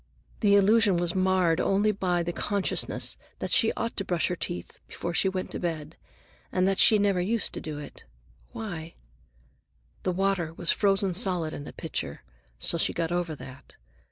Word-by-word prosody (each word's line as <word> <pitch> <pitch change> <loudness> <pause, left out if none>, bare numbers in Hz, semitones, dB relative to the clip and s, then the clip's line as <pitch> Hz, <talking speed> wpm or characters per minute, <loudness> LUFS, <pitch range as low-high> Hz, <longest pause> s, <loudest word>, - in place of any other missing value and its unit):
The 200 -1 +4
illusion 205 -1 +4
was 175 0 -1
marred 185 -3 +2
only 205 +2 +2
by 180 -4 0
the 175 +1 -3
consciousness 200 +2 0 0.2
that - - -4
she 225 - +5
ought 230 0 -3
to 195 - -1
brush 175 -3 0
her 180 - -1
teeth 175 0 -5
before 170 - -5
she 190 - +2
went 185 -1 -4
to - - -4
bed, 160 -2 -4 0.6
and 185 0 +2
that 195 0 +1
she 215 - +7
never 200 -3 +2
used 220 +5 +1
to - - -5
do 155 -2 -6
it. 145 - -10 0.5
Why—? 175 -9 -6 1.1
The 185 - 0
water 180 -3 0
was 175 - +2
frozen 195 -2 +2
solid 180 -5 +1
in 145 - -7
the - - -8
pitcher, - - -5 0.3
so 170 - -2
she - - +2
got 165 0 -2
over 175 -2 -1
that. 130 0 -12
185 Hz, 180 wpm, -27 LUFS, 170-200 Hz, 1.1 s, she